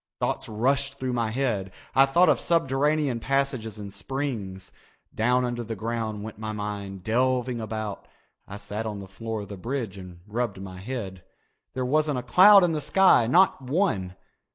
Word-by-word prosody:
Thoughts - - -2
rushed 135 +6 0
through 130 -1 -3
my 115 -2 0
head. 110 -6 -1 0.2
I 135 +1 +6
thought 175 +6 +4
of - - +4
subterranean 145 -4 +1
passages 130 -4 -1
and 100 -2 -8
springs. 105 -11 -4 0.4
Down 125 +3 +2
under 120 -1 -3
the 115 0 -5
ground 110 -1 -3
went 110 -1 -8
my 110 0 -4
mind, 100 -2 -5
delving 125 +1 0
about. 110 -2 -5 0.4
I 100 - -7
sat 105 +2 -5
on 105 -1 -4
the 100 -1 -8
floor 110 +3 -5
of 100 - -9
the 100 - -7
bridge 115 -2 -4
and 90 -2 -11
rubbed 110 -2 -2
my 95 -1 -8
head. 95 -5 -6 0.5
There 130 -1 -1
wasn't 150 +1 +1
a 125 - -3
cloud 190 - +7
in 175 - +3
the 155 -2 -2
sky, 185 -10 +4
not 175 +4 +4
one. 125 - -1
115 Hz, 175 wpm, -26 LUFS, 105-135 Hz, 0.5 s, cloud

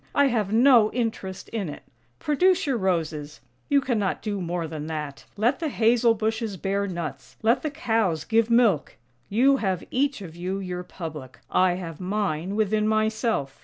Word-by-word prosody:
I 285 -1 +5
have 215 -5 0
no 230 -2 +6
interest 220 -6 -3
in 205 -7 -3
it. 145 - -9 0.3
Produce 355 - +2
your 275 -3 +1
roses 160 - -2
— - - -40
you 280 -1 +4
cannot 220 -8 -1
do 205 -3 -2
more 170 -1 -2
than 155 -1 -6
that 150 -3 -5
— - - -34
let 240 +6 +2
the 320 - -1
hazel 230 -1 +3
bushes 220 -1 -2
bear 200 +2 -1
nuts, 160 -8 -6
let 230 +2 +3
the 305 - -2
cows 220 - 0
give 225 +4 +2
milk! 230 - +3 0.3
You 265 +6 +4
have 190 -6 -1
each 275 -4 0
of 165 -3 -10
you 180 +3 -3
your 180 -2 -4
public; 155 -7 -8
I 185 -1 +4
have 170 -4 -6
mine 190 -2 -2
within 215 0 +1
myself. 215 - 0
205 Hz, 175 wpm, -25 LUFS, 175-230 Hz, 0.3 s, no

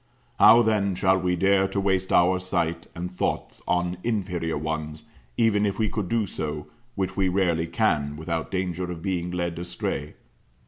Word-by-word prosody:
How 120 +1 +8
then 100 -4 +1
shall 95 +1 +3
we 90 0 0
dare 95 +2 +3
to 100 - -2
waste 95 -1 0
our 90 +1 +4
sight 85 -2 -2
and 90 +1 -4
thoughts - - -3
on 90 0 0
inferior 90 -8 -1
ones, 80 0 -4 0.3
even 110 -3 +3
if 100 -2 0
we 110 -2 +1
could 100 -5 -3
do 115 -2 +1
so, 75 -4 -4 0.3
which 95 -2 -2
we 95 -2 +2
rarely 85 -3 +1
can, 75 -8 0
without 80 +1 -3
danger 90 -1 -2
of 85 -2 -6
being 90 -2 -1
led 85 -1 -3
astray? 85 0 -4
90 Hz, 170 wpm, -25 LUFS, 85-95 Hz, 0.3 s, How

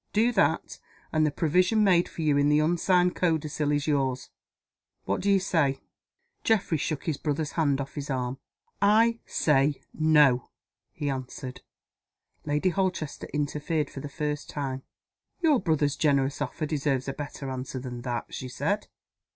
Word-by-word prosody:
Do 225 +3 +3
that - - +1 0.3
and 155 -1 +3
the - - 0
provision 180 +8 +2
made 180 -3 +4
for 165 - -5
you 150 -2 +3
in 145 0 +3
the 150 - +4
unsigned 175 +3 +2
codicil 155 -3 0
is 145 0 0
yours. 135 -4 0 0.7
What - - -1
do 200 - 0
you 195 -1 +5
say?" 160 -7 +1 0.6
Geoffrey 195 -8 +2
shook 155 0 -2
his 155 -4 -1
brother's 150 0 -2
hand 145 -4 +1
off 140 0 -5
his 145 -1 -6
arm. 130 0 -2 0.4
"I 225 +3 +4
say 145 -1 +2
No!" 150 -6 +4 0.4
he 145 - -4
answered. 130 0 -6 0.8
Lady 150 +5 +1
Holchester 185 -5 -2
interfered 150 +1 -1
for - - -7
the 145 - -6
first 150 -1 -3
time. 135 -2 -3 0.6
"Your 315 -7 +4
brother's 150 -5 +1
generous 140 -3 +1
offer 155 - -2
deserves 140 -3 -1
a 135 - -2
better 145 -2 -6
answer 130 0 -5
than 125 -1 -6
that," 120 -1 -4
she 130 - -5
said. 180 +11 -1
150 Hz, 155 wpm, -27 LUFS, 135-170 Hz, 0.8 s, you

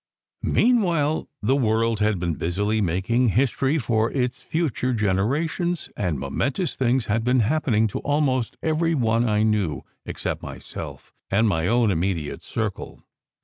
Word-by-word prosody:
Meanwhile, 175 -11 +2
the 130 +6 +3
world 115 -3 +1
had 105 -1 +2
been 85 -1 -1
busily 105 +7 -1
making 100 +8 +1
history 130 - +1
for 115 -4 +1
its 125 -2 -1
future 145 -6 -1
generations, 140 - 0
and 90 -7 -1
momentous 135 - -2
things 130 -1 +1
had 110 +2 0
been 125 +1 +3
hap 155 +9 0
pening 110 -2 +3
to - - -4
almost 140 -5 0
every 165 +1 +1
one 115 -2 +2
I 105 0 +2
knew, 105 - 0 0.2
except - - -4
myself - - -8 0.2
and 110 +4 +3
my 80 -4 +1
own 115 -1 +3
immediate 85 -3 -2
circle. - - -4
115 Hz, 145 wpm, -24 LUFS, 105-140 Hz, 0.2 s, the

